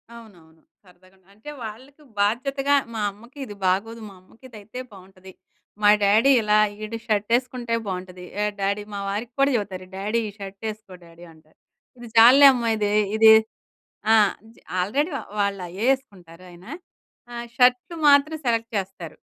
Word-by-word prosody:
అవునవును. 170 -8 -17 0.2
సరదాగనే. 185 0 -24
అంటే, 215 +8 -12
వాళ్ళకి 260 +7 -11 0.2
బాధ్యతగా 275 +7 +1 0.2
మా 225 - -4
అమ్మకి 235 +8 -17
ఇది 205 - -10
బాగోదు. 225 +5 -1
మా 195 - -15
అమ్మకిదైతే 220 +2 -13
బావుంటది. 190 -1 -15 0.5
మా 205 - +6
డ్యాడీ 220 +7 +4
ఇలా. 210 0 +3 0.2
ఈడు 220 +2 -5
షర్టేసుకుంటే 235 +3 -1
బావుంటది. 180 -1 -7 0.2
ఏహ్! 210 0 -1
డ్యాడీ 200 +1 -1
మా 200 - -4
వారిక్కూడా 240 +7 -1
చెవుతరు. 195 -4 -4
"డ్యాడీ! 210 +4 -1
ఈ - - -5
షర్ట్ 195 0 -9
యేసుకో 215 -3 -8
డ్యాడీ" 170 +1 -16
అంటారు. 155 -1 -25 0.4
ఇది 240 0 -11
చాలులేమ్మా 250 0 +7
ఇదే, 205 -1 -1 0.2
ఇది. 220 0 +7 0.8
ఆ! - - +7 0.4
జ్ - - -21 0.2
ఆల్రెడీ 280 - -1
ఆహ్, - - -12
వాళ్ళయ్యే 200 0 -2
యేసుకుంటారు 185 -10 -6
ఆయన. 175 +1 -16 0.7
ఆహ్, 235 0 -6
షర్టు 250 +6 +2
మాత్రం 285 +2 +4
సెలెక్ట్ 230 0 -1
చేస్తారు. 185 -4 -6
210 Hz, 140 wpm, -23 LUFS, 190-240 Hz, 0.8 s, చాలులేమ్మా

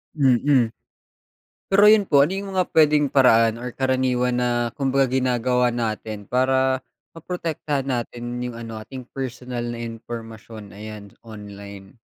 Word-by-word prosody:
Mm, 130 -3 +3 1.0
pero 200 +1 +5
'yun 210 -1 +7
po, 140 -2 +6
ano 170 - -2
'yung 195 +1 -4
mga 185 - +3
puwedeng 150 -2 +4
paraan 115 -4 +4
or 125 0 -5
karaniwan 130 -1 +1
na 125 - +1 0.2
kumbaga 135 0 +1
ginagawa 125 -1 +1
natin 110 -3 -3
para 130 +2 +1 0.3
maprotektahan 160 -4 -3
natin 120 -1 -4
'yung 125 -1 -5
ano, 115 -1 -7
ating 130 +3 -9
personal 125 -2 -5
na 120 - -4
impormasyon 115 -2 -9
ayan 105 0 -9
online? 100 -3 -11
125 Hz, 130 wpm, -23 LUFS, 115-135 Hz, 1.0 s, yun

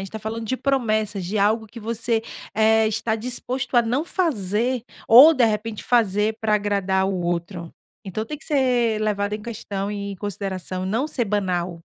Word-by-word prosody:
gente 195 - -6
está 220 - -7
falando 220 +1 -5
de 260 +4 -1
promessas, 215 -8 0
de 200 +4 -2
algo 220 +3 +2
que 230 +3 -12
você, 230 +1 -1 0.3
eh, 220 0 +4
está 220 +1 -1
disposto 250 +2 -1
a 240 - +6
não 245 +6 -1
fazer 245 - -1 0.2
ou 280 +8 +9
de 255 - +3
repente 215 0 -2
fazer 215 -2 +2
pra 215 -1 +1
agradar 195 -2 +1
o 190 -2 -2
outro. 170 0 -3 0.3
Então, 205 +3 -4
tem 300 +6 -7
que - - -11
ser 245 -6 +1
levado 205 -1 -1
em 210 - -6
questão 205 -3 -5
e 200 -1 -4
em - - -9
consideração, 190 -2 -4
não 225 +9 0
ser 255 -5 -1
banal. 185 -4 -2
215 Hz, 180 wpm, -23 LUFS, 200-235 Hz, 0.3 s, ou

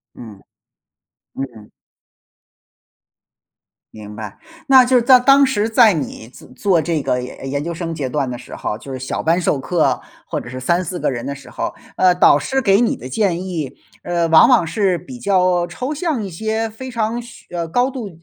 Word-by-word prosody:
嗯。 105 -5 -12 0.9
嗯。 120 -6 -7 2.2
明 105 -1 -10
白， 105 -2 -8 0.3
那 260 -1 +8
就 255 +1 +1
是 245 - +4
在 255 +2 +7
当 275 +2 +5
时 225 -5 0
在 225 -1 +5
你 145 -8 -5
做 125 - -16
做 180 +3 +2
这 160 -1 -1
个 125 - 0
研 130 +2 -7
研 140 +1 -2
究 170 +1 -4
生 165 0 -4
阶 145 -5 -3
段 135 -1 -2
的 125 - -5
时 120 - -11
候， 105 - -4
就 135 - -9
是 130 - -6
小 130 - -3
班 165 +3 +2
授 155 -4 0
课 160 +4 0 0.3
或 - - -3
者 - - -10
是 130 +1 -7
3-4 175 +6 -1
个 - - 0
人 120 -1 -5
的 140 - -3
时 140 -1 -13
候， - - -4 0.2
呃， 185 -1 +4
导 175 -4 +5
师 265 - -1
给 200 -1 +4
你 240 - +1
的 130 - -9
建 180 +4 0
议， 165 -8 -4 0.3
呃， 170 -1 0
往 165 +8 +7
往 245 -8 +5
是 190 +2 0
比 245 +9 -10
较 185 -5 +2
抽 250 +11 -5
象 305 -6 -2
一 195 - -6
些， 220 +5 -2
非 225 +4 -9
常 230 -1 -2
需 235 -5 -14
呃， 170 -1 -2
高 245 +11 +1
度 250 -6 -6
175 Hz, 205 characters per minute, -19 LUFS, 135-225 Hz, 2.2 s, 那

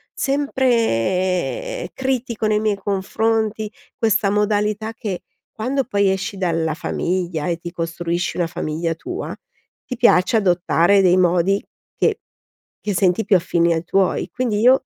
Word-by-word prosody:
sempre 250 - 0
critico 255 -4 -2
nei 215 0 +2
miei 215 -1 +1
confronti, 215 +2 -1 0.3
questa 215 -2 +2
modalità 210 +1 0
che 205 -5 -5 0.3
quando 260 +4 -1
poi 200 -5 +2
esci 190 +1 -3
dalla 165 -4 0
famiglia 170 -2 -2
e 170 -1 0
ti 170 +1 -8
costruisci 170 +1 -3
una 175 - +1
famiglia 165 0 -2
tua, 360 - -6 0.5
ti 250 - -5
piace 230 -3 +4
adottare 180 0 +3
dei 185 -1 +4
modi 180 +2 +2 0.3
che 435 - +1 0.6
che 205 - -2
senti 185 +3 +2
più 205 -1 +4
affini 170 -1 +1
ai 165 0 -2
tuoi. 190 +1 +1
Quindi 230 -5 -1
io 255 +3 +5
200 Hz, 135 wpm, -20 LUFS, 175-225 Hz, 0.6 s, io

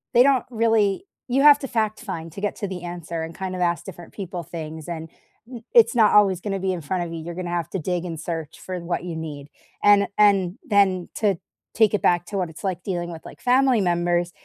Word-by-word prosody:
they 245 - +8
don't 270 -2 +3
really 225 - +2 0.2
you 265 +3 +2
have 290 -1 +8
to 270 - -5
fact 215 -2 -1
find 165 -7 -6
to 195 - -9
get 205 - -1
to 205 - -3
the 180 -2 -6
answer 170 -1 -5
and 165 0 -7
kind 185 -1 -4
of 180 - -4
ask 170 -1 +1
different 175 -3 -10
people 180 -3 -5
things, 160 -1 -7
and 165 -1 -6
i 240 0 -14
it's 460 - +6
not 220 -3 +5
always 195 -4 +4
gonna 195 -2 -2
be 190 0 0
in 170 - -5
front 175 +4 -2
of 170 - -6
you, 160 -1 -6
you're 170 +1 -6
gonna 180 -1 -4
have 170 -2 -2
to 190 - -2
dig 175 +2 -2
and 165 -3 -5
search 160 -2 -5
for 185 -1 -5
what 170 0 -3
you 170 -2 -5
need. 150 -3 -6 0.4
And 205 -1 +6
and 200 -2 +4
then 190 -3 +3
to 200 -5 +1 0.4
take 220 -2 +4
it - - -2
back 175 0 +3
to 200 - -4
what 180 -3 -1
it's 160 - -12
like 180 -3 -2
dealing 175 -3 -3
with, 160 - -10
like, - - -12
family 255 -2 +3
members, 175 0 +1
180 Hz, 240 wpm, -23 LUFS, 170-205 Hz, 0.4 s, they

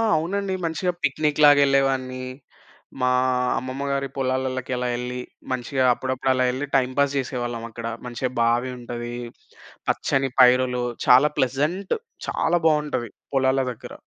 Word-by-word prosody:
అవునండి 190 +4 -1
మంచిగా 165 +3 -1
పిక్‌నిక్ 150 +2 +1
లాగెళ్ళేవాన్ని. 135 -3 +3 0.8
మా 125 - +3 0.5
అమ్మమ్మ 130 +1 -5
గారి 140 0 -1
పొలాలల్లకి 130 -1 -1
అలా 125 0 -1
యెళ్లి 125 +1 -4 0.3
మంచిగా 130 +1 0
అప్పుడప్పుడు 130 +1 -2
అలా 130 0 +1
యెళ్లి 130 +3 -2
టైమ్ 130 -1 +2
పాస్ 140 0 +2
జేసేవాళ్ళమక్కడ. 120 -3 -4 0.2
మంచిగా 125 +1 -3
బావి 120 +2 +2
ఉంటది. 120 0 -6 0.7
పచ్చని 135 0 +1
పైరలు 125 0 +4 0.2
చాలా 130 +4 +7
ప్లెజెంట్, 150 +10 0 0.3
చాలా 175 - +1
బాగుంటది 150 -7 0 0.2
పొలాల 135 0 +3
దగ్గర. - - -11
130 Hz, 120 wpm, -23 LUFS, 125-140 Hz, 0.8 s, చాలా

